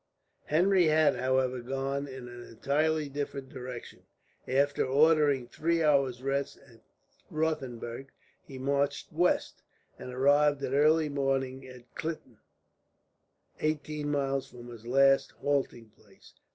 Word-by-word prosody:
Henry 180 +3 +3
had, 155 -1 +4
however, 130 0 0
gone 135 +3 -3
in 130 -2 -8
an 120 0 -10
entirely 150 +6 0
different 140 -1 -5
direction. 125 -3 -8 0.5
After 140 +2 +2
ordering 145 -1 +3
three 165 +6 0
hours' 135 -4 +2
rest 140 +1 -2
at 115 -4 -20 0.5
Rothenburg 135 -5 -3 0.3
he 135 - -10
marched 140 +2 -1
west, 175 +3 +1 0.4
and 125 - -7
arrived 145 +2 +3
at 130 - -2
early 155 +2 +4
morning 135 -2 -1
at 125 -1 -14
Klitten, 155 -8 -6 1.2
eighteen 150 -1 -2
miles 135 -2 -1
from 120 -1 -12
his 115 -1 -11
last 135 +2 +4
halting 130 -6 -2
place. 100 -2 -21
135 Hz, 120 wpm, -29 LUFS, 130-150 Hz, 1.2 s, had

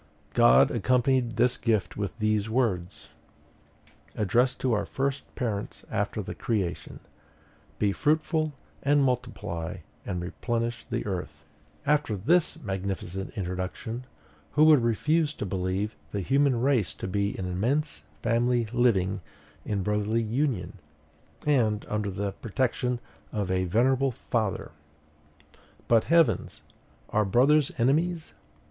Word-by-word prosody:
God 60 +2 +6
accompanied 125 -1 +2
this 120 +3 +2
gift 110 -5 0
with 100 0 -4
these 110 -1 +1
words, 100 -7 -1 1.1
addressed 120 +6 +2
to 130 -3 +2
our 105 -2 +1
first 135 +4 -3
parents 110 -6 -3
after - - -1
the - - -5
creation: 100 -7 -3 0.8
'Be 105 -1 +2
fruitful, 155 - +1 0.3
and 145 0 +3
multiply 120 -10 -2 0.3
and 90 - -3
replenish 115 +6 -3
the - - -2
earth,'" 95 -4 -5
&c. - - -32
After 145 -6 +2
this 165 - +2
magnificent 95 - -4
introduction, 95 +6 -4 0.5
who 150 - +5
would 155 -4 +7
refuse 150 +7 +1
to - - -4
believe 95 +2 -2
the 100 - -3
human 135 +3 +2
race 125 - +1
to - - -5
be 100 +1 -1
an 95 - -3
immense 110 - -1 0.2
family 120 0 +2
living 100 -6 +2 0.4
in 100 -3 -1
brotherly 105 +3 0
union, 110 - -1 0.7
and 115 -8 +2
under 105 -1 -1
the 100 +1 -2
protection 125 +3 -1 0.3
of 100 -4 -2
a 95 0 +1
venerable 130 +8 +3
father? 115 -4 -2 1.2
But, 115 -2 +4
heavens! 165 -1 +2 0.5
are 105 - +3
brothers 135 +8 +4
enemies? 155 +7 +1
115 Hz, 120 wpm, -27 LUFS, 100-130 Hz, 1.2 s, would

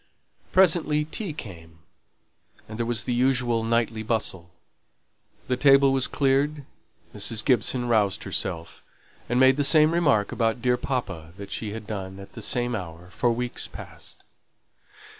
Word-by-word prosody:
Presently 165 -5 +3
tea 180 +4 -4
came, 85 - -10 0.9
and 110 +1 -9
there 115 - -1
was 115 -3 -1
the 125 - -2
usual 120 -2 +1
nightly 115 -1 0
bustle. 110 -6 -2 1.0
The 125 - +1
table 135 +1 +5
was 135 -2 +2
cleared, 140 +1 0 0.5
Mrs. 110 -1 -1
Gibson 125 0 +1
roused 105 -3 +1
herself, 90 -3 -3 0.5
and 120 +1 +1
made 130 +1 +5
the 145 - +1
same 155 +2 +5
remark 140 -12 +2
about 115 0 0
dear 125 +1 +2
papa 85 - -4
that 100 -1 -9
she 105 -2 -4
had 110 -1 -7
done 95 -2 -6
at 100 - -12
the 115 - -9
same 120 +2 0
hour 90 -2 -8
for 120 +5 +1
weeks 120 +1 -2
past. - - -12
120 Hz, 145 wpm, -25 LUFS, 105-135 Hz, 1.0 s, table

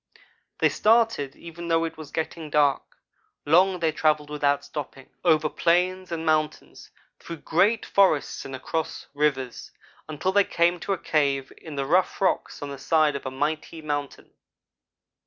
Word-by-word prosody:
"They - - +3
started, 220 - +2
even 170 0 -9
though 165 0 +2
it 165 - -4
was 155 -3 -10
getting 160 0 -4
dark. 145 -2 +3 0.6
Long 180 +5 +4
they 165 -2 +1
travelled 150 -1 +1
without 145 -1 0
stopping 135 -3 -8
over 155 -3 +3
plains 180 +3 +1
and 165 -1 -3
mountains 155 -1 -1 0.3
through 165 -2 -9
great 210 +7 +2
forests 190 -7 +2
and 135 - -7
across 160 +4 -4
rivers, 140 -4 -1 0.4
until 155 +5 -1
they 200 +1 +4
came 175 -1 +1
to 200 - -2
a - - -2
cave 140 -3 0
in 160 -3 -10
the 140 -1 -2
rough 180 +6 +2
rocks 190 -5 -1
on 145 - -5
the 140 - -8
side 155 0 +2
of 140 - -5
a - - -1
mighty 155 +4 -3
mountain. 145 -2 -4
155 Hz, 155 wpm, -25 LUFS, 145-170 Hz, 0.6 s, Long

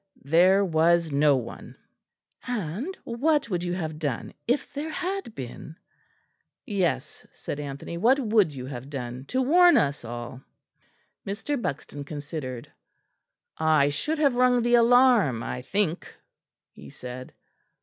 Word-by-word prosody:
"There 180 +7 +4
was 165 -1 +2
no 145 0 +4
one." 125 - -8 0.7
"And 240 - -3
what 275 +1 0
would 175 -1 -1
you 175 0 -2
have 160 -4 -4
done 145 -7 -3
if 255 +4 0
there 295 +3 -4
had 365 - -4
been?" 130 +5 -8 0.9
"Yes," 175 - -2
said 145 - -6
Anthony, 145 +4 -6
"what 245 +8 +4
would 215 - +3
you 130 -3 -7
have 130 0 -7
done 130 -2 -6
to 260 - 0
warn 350 +6 +6
us 145 -2 0
all?" 120 +2 -7 0.8
Mr. 210 +9 -3
Buxton 145 -4 -5
considered. 140 -4 -6 0.9
"I 155 -3 +4
should 300 - -2
have 285 -4 +3
rung 250 -1 +3
the 240 0 +1
alarm, 235 - +5
I 125 - -4
think," 180 +4 -2 0.6
he 70 - -13
said. 125 - -9
170 Hz, 130 wpm, -26 LUFS, -, 0.9 s, warn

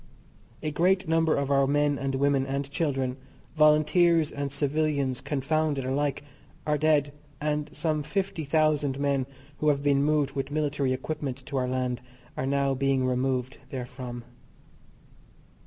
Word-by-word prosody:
A 155 - -1
great 185 +4 +2
number 160 0 +3
of 140 0 -1
our 140 -1 +4
men 145 0 +2
and 135 0 -1
women 140 0 +2
and 140 +1 -2
children, 135 -4 -1 0.4
Volunteers 155 +1 +4
and 140 -1 -3
civilians 140 -3 0
confounded 145 0 0
alike, 140 +1 -1 0.4
are 150 - +2
dead, 150 -2 +2 0.3
and 150 0 -1
some 155 -1 -1
fifty 185 +1 -2
thousand 150 -2 +1
men 140 -2 0 0.3
who 150 - 0
have 140 -1 +1
been 140 -1 +3
moved 145 -1 +2
with 135 -1 -3
military 145 -3 0
equipment 135 -1 -4
to 140 - -6
our 130 -1 +1
land 125 -1 -1 0.3
are 130 - -2
now 140 0 +1
being 135 -1 +1
removed 130 0 -1
therefrom. 125 -1 -6
140 Hz, 140 wpm, -27 LUFS, 135-150 Hz, 0.4 s, our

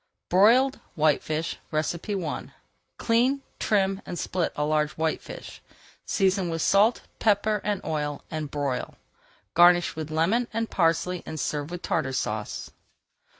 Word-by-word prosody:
BROILED 240 +8 +5 0.2
WHITEFISH 155 +1 +1
I 170 +3 -2 0.5
Clean, 250 +4 +2 0.2
trim, 195 -2 +1
and 175 - -6
split 180 -1 -1
a 150 - -1
large 150 0 +1
whitefish, 160 0 -4 0.5
season 190 -2 +1
with 165 -1 -1
salt, 210 +4 +4 0.2
pepper, 210 -1 +2
and 205 -1 -2
oil, 150 -2 -2
and 155 -2 -3
broil. 140 -3 -3 0.6
Garnish 175 0 +5
with 155 -1 -5
lemon 180 +10 +1
and 225 0 -2
parsley 175 +1 +1
and 155 - -6
serve 145 +3 -2
with 175 0 -7
Tartar 140 -5 -1
Sauce. 105 -4 -3
175 Hz, 125 wpm, -26 LUFS, 155-205 Hz, 0.6 s, BROILED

